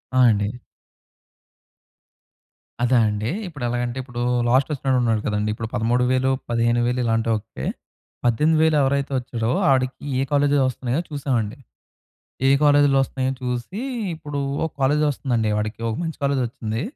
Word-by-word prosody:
ఆ! -, -, +4 dB
అండి. 105 Hz, +4 st, -1 dB, 2.2 s
అదా 125 Hz, 0 st, +4 dB
అండి. 105 Hz, +2 st, -2 dB, 0.2 s
ఇప్పుడు 145 Hz, -7 st, -8 dB
ఎలాగంటే 120 Hz, +1 st, -2 dB
ఇప్పుడు, 120 Hz, -2 st, -6 dB, 0.3 s
లాస్ట్ 130 Hz, +4 st, +3 dB
ఒచ్చినోడు 135 Hz, -2 st, 0 dB
ఉన్నాడు 110 Hz, -3 st, +1 dB
కదండీ! 105 Hz, 0 st, 0 dB
ఇప్పుడు 115 Hz, 0 st, -5 dB
13 120 Hz, +1 st, +1 dB
వేలు, 130 Hz, +1 st, +2 dB, 0.2 s
15 120 Hz, 0 st, +2 dB
వేలు 125 Hz, +1 st, 0 dB
ఇలాంటోళ్లకే, 115 Hz, -1 st, -1 dB, 0.6 s
18 150 Hz, +7 st, +3 dB
వేలు 160 Hz, -1 st, +3 dB
ఎవరైతే 140 Hz, +1 st, 0 dB
వచ్చాడో 120 Hz, -2 st, -3 dB, 0.2 s
ఆడికి 130 Hz, 0 st, +1 dB, 0.2 s
ఏ -, -, +2 dB
కాలేజీలు 145 Hz, -1 st, +3 dB
వస్తునయో 130 Hz, +3 st, -2 dB
చూసామండి. 130 Hz, -5 st, -2 dB, 0.9 s
ఏ -, -, +6 dB
కాలేజీ‌లో 145 Hz, -1 st, +5 dB
వస్తున్నాయో 130 Hz, 0 st, -2 dB
చూసి, 125 Hz, -, -3 dB, 0.4 s
ఇప్పుడు 145 Hz, -2 st, -5 dB, 0.2 s
ఒక 160 Hz, -, -2 dB
కాలేజ్ 150 Hz, +3 st, +3 dB
వస్తుందండి 120 Hz, -5 st, -1 dB
వాడికి, 105 Hz, +1 st, -3 dB
ఒక 110 Hz, -, -2 dB
మంచి 165 Hz, -1 st, -4 dB
కాలేజ్ 140 Hz, -2 st, +1 dB
వచ్చింది. 110 Hz, -1 st, -4 dB
125 Hz, 140 wpm, -22 LUFS, 115-140 Hz, 2.2 s, ఏ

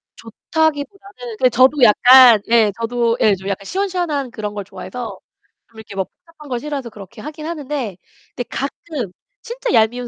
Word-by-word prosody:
좋다기보다는 290 Hz, -, -3 dB
그 255 Hz, -, +5 dB
저도 260 Hz, +4 st, +3 dB
약간 245 Hz, 0 st, +8 dB
예, 225 Hz, -3 st, +4 dB
저도 235 Hz, 0 st, 0 dB
예 210 Hz, -2 st, +4 dB
좀 190 Hz, +1 st, -10 dB
약간 195 Hz, 0 st, -4 dB
시원시원한 350 Hz, -, -2 dB
그런 210 Hz, -2 st, -5 dB
걸 205 Hz, -, -5 dB
좋아해서 195 Hz, +5 st, -8 dB, 0.5 s
좀 225 Hz, -1 st, -15 dB
이렇게 210 Hz, -2 st, -11 dB
뭐 190 Hz, -1 st, -1 dB
복잡한 310 Hz, -4 st, -18 dB
걸 245 Hz, -1 st, -2 dB
싫어해서 280 Hz, -4 st, -5 dB
그렇게 215 Hz, +1 st, -12 dB
하긴 305 Hz, +1 st, -8 dB
하는데 285 Hz, -, -4 dB, 0.4 s
근데 245 Hz, -, -3 dB
가끔 275 Hz, -, -5 dB, 0.3 s
진짜 485 Hz, 0 st, -4 dB
얄미운 240 Hz, +3 st, +2 dB
245 Hz, 355 characters per minute, -19 LUFS, 220-300 Hz, 0.5 s, 약간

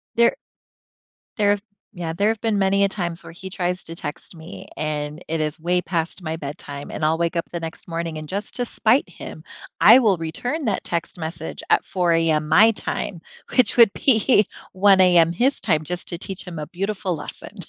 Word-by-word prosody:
There 235 Hz, 0 st, +4 dB, 1.0 s
There've 205 Hz, -1 st, +2 dB, 0.3 s
Yeah, 175 Hz, -4 st, -4 dB
there 200 Hz, +5 st, +1 dB
have 225 Hz, -1 st, -1 dB
been 225 Hz, -3 st, +1 dB
many 195 Hz, +1 st, +3 dB
a 200 Hz, -, +3 dB
times 175 Hz, -4 st, -4 dB
where -, -, -10 dB
he 190 Hz, +2 st, -8 dB
tries 180 Hz, 0 st, -2 dB
to 165 Hz, -, -6 dB
text 150 Hz, +2 st, -5 dB
me 160 Hz, +3 st, -10 dB
and 150 Hz, +1 st, -3 dB
it 165 Hz, 0 st, -1 dB
is 150 Hz, -1 st, -2 dB
way 180 Hz, +2 st, +1 dB
past 170 Hz, +1 st, -2 dB
my 160 Hz, -1 st, -3 dB
bedtime, 145 Hz, -1 st, -7 dB
and -, -, -5 dB
I'll 160 Hz, +1 st, +2 dB
wake 170 Hz, +1 st, -1 dB
up 170 Hz, -, -2 dB
the 170 Hz, -, -3 dB
next 165 Hz, +2 st, -7 dB
morning 165 Hz, -1 st, -4 dB
and 155 Hz, 0 st, -7 dB
just 200 Hz, +2 st, -4 dB
to 245 Hz, -, 0 dB
spite 235 Hz, +3 st, +2 dB
him, 155 Hz, -2 st, -10 dB, 0.4 s
I 230 Hz, +5 st, +9 dB
will 210 Hz, -7 st, +3 dB
return 245 Hz, -, -3 dB
that 210 Hz, -4 st, -1 dB
text 170 Hz, 0 st, -3 dB
message 160 Hz, -1 st, -6 dB
at -, -, +3 dB
4:00 180 Hz, -2 st, 0 dB
AM 160 Hz, -2 st, +2 dB
my 215 Hz, +8 st, +7 dB
time, 190 Hz, -4 st, -4 dB, 0.3 s
which 250 Hz, -3 st, +3 dB
would 230 Hz, -4 st, +8 dB
be 225 Hz, -3 st, +3 dB, 0.3 s
1:00 195 Hz, 0 st, +5 dB
AM 175 Hz, -3 st, +5 dB
his 255 Hz, +10 st, +1 dB
time 155 Hz, 0 st, +2 dB
just 180 Hz, +1 st, -4 dB
to 170 Hz, -, -1 dB
teach 190 Hz, +1 st, -4 dB
him 170 Hz, -4 st, -7 dB
a 150 Hz, -, -5 dB
beautiful 195 Hz, 0 st, -3 dB
lesson. -, -, -9 dB
175 Hz, 200 wpm, -22 LUFS, 160-205 Hz, 1.0 s, I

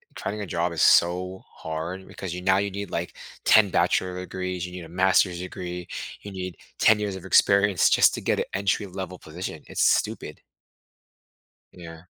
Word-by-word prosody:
trying 105 Hz, 0 st, -4 dB
a 105 Hz, -, -3 dB
job 85 Hz, 0 st, -1 dB
is -, -, -2 dB
so 90 Hz, +2 st, +3 dB
hard 80 Hz, +4 st, -6 dB
because 95 Hz, -3 st, -7 dB
you 90 Hz, -, -5 dB
now 95 Hz, +1 st, +3 dB
you 100 Hz, 0 st, -1 dB
need, 100 Hz, 0 st, -6 dB
like, 85 Hz, +1 st, -4 dB, 0.3 s
10 110 Hz, -2 st, +6 dB
bachelor 90 Hz, +1 st, +1 dB
degrees, 90 Hz, -1 st, -4 dB
you 90 Hz, -, -8 dB
need 90 Hz, -2 st, -7 dB
a -, -, -13 dB
master's 90 Hz, 0 st, +2 dB
degree, 90 Hz, -1 st, -6 dB, 0.3 s
you 100 Hz, -, -9 dB
need 90 Hz, -1 st, -6 dB, 0.2 s
10 110 Hz, -1 st, +5 dB
years 100 Hz, -2 st, -2 dB
of 95 Hz, -, -9 dB
experience 100 Hz, +1 st, +4 dB
just -, -, +5 dB
to -, -, -6 dB
get -, -, 0 dB
an -, -, 0 dB
entry 100 Hz, +1 st, 0 dB
level 95 Hz, -1 st, -7 dB
position, 80 Hz, -1 st, -7 dB
it's -, -, -3 dB
stupid. -, -, 0 dB, 1.3 s
Yeah. 80 Hz, -1 st, -11 dB
90 Hz, 175 wpm, -25 LUFS, 90-95 Hz, 1.3 s, 10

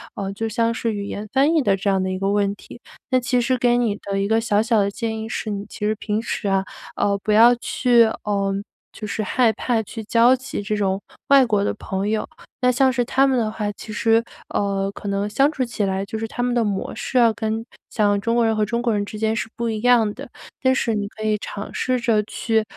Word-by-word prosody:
呃， 195 Hz, 0 st, -4 dB
就 225 Hz, +3 st, -3 dB
像 230 Hz, +1 st, +1 dB
是 230 Hz, 0 st, -2 dB
语 200 Hz, -1 st, -4 dB
言 205 Hz, +1 st, -5 dB
翻 280 Hz, +5 st, +3 dB
译 315 Hz, -, +4 dB
的 200 Hz, -7 st, +2 dB
这 200 Hz, +1 st, -1 dB
样 190 Hz, -1 st, +1 dB
的 185 Hz, -, -2 dB
一 185 Hz, -, -3 dB
个 195 Hz, 0 st, 0 dB
问 200 Hz, -1 st, +1 dB
题。 235 Hz, -, -13 dB, 0.3 s
那 255 Hz, -1 st, +2 dB
其 250 Hz, 0 st, +1 dB
实 255 Hz, +2 st, +1 dB
给 240 Hz, 0 st, +3 dB
你 230 Hz, -4 st, +1 dB
的 195 Hz, 0 st, -2 dB
一 200 Hz, -, 0 dB
个 225 Hz, +2 st, +2 dB
小 210 Hz, -2 st, +2 dB
小 225 Hz, -1 st, +2 dB
的 200 Hz, 0 st, 0 dB
建 220 Hz, +1 st, -3 dB
议 220 Hz, 0 st, -5 dB
是， 220 Hz, -, -3 dB
你 200 Hz, -1 st, -4 dB
其 210 Hz, -, -5 dB
实 215 Hz, -, +1 dB
平 215 Hz, 0 st, -2 dB
时 220 Hz, -3 st, -3 dB
啊， 195 Hz, 0 st, +1 dB, 0.3 s
呃， 200 Hz, 0 st, +1 dB
不 210 Hz, -, -2 dB
要 230 Hz, +3 st, +7 dB
去 240 Hz, 0 st, +3 dB, 0.2 s
呃， 200 Hz, -1 st, 0 dB, 0.4 s
就 215 Hz, -, -7 dB
是 215 Hz, +1 st, -2 dB
害 230 Hz, +2 st, +2 dB
怕 230 Hz, +1 st, 0 dB
去 220 Hz, +1 st, -8 dB
交 235 Hz, +4 st, +4 dB
集 260 Hz, -3 st, -5 dB
这 210 Hz, +1 st, -2 dB
种， 195 Hz, -1 st, 0 dB, 0.3 s
外 275 Hz, -2 st, +7 dB
国 210 Hz, -4 st, +1 dB
的 -, -, 0 dB
朋 195 Hz, 0 st, -3 dB
友。 215 Hz, 0 st, -1 dB, 0.4 s
那 250 Hz, -, +5 dB
像 260 Hz, +1 st, +3 dB
是 245 Hz, 0 st, +1 dB
他 270 Hz, +2 st, +3 dB
们 265 Hz, -2 st, +2 dB
的 220 Hz, -2 st, 0 dB
话， 210 Hz, -1 st, -3 dB
其 215 Hz, -, -10 dB
实， 225 Hz, +1 st, +3 dB, 0.3 s
呃， 195 Hz, -1 st, -1 dB
可 205 Hz, -, -9 dB
能 200 Hz, +1 st, -1 dB
相 275 Hz, +7 st, +3 dB
处 275 Hz, -4 st, -2 dB
起 230 Hz, -3 st, -3 dB
来 190 Hz, 0 st, -1 dB
就 220 Hz, +2 st, -5 dB
是 225 Hz, -, -3 dB
他 245 Hz, -, -4 dB
们 245 Hz, 0 st, 0 dB
的 240 Hz, -1 st, +2 dB
模 200 Hz, -3 st, -2 dB
式 255 Hz, -, -3 dB
啊， 235 Hz, -2 st, +6 dB
跟 220 Hz, 0 st, -2 dB, 0.2 s
像 205 Hz, -2 st, +2 dB
中 230 Hz, +3 st, 0 dB
国 235 Hz, -1 st, +3 dB
人 225 Hz, -, +2 dB
和 215 Hz, -, +1 dB
中 235 Hz, +3 st, -2 dB
国 235 Hz, -2 st, +1 dB
人 205 Hz, -1 st, 0 dB
之 215 Hz, -, -8 dB
间 220 Hz, +1 st, 0 dB
是 225 Hz, -, -3 dB
不 235 Hz, -, -2 dB
一 220 Hz, -1 st, -2 dB
样 235 Hz, -3 st, +4 dB
的。 275 Hz, +3 st, -10 dB, 0.3 s
但 260 Hz, 0 st, +3 dB
是 230 Hz, -3 st, 0 dB
你 205 Hz, -1 st, -2 dB
可 215 Hz, +1 st, -9 dB
以 215 Hz, -1 st, +1 dB
尝 200 Hz, 0 st, -7 dB
试 255 Hz, -1 st, 0 dB
着 230 Hz, -3 st, +2 dB
去， 220 Hz, +1 st, 0 dB
220 Hz, 275 characters per minute, -22 LUFS, 205-240 Hz, 0.4 s, 要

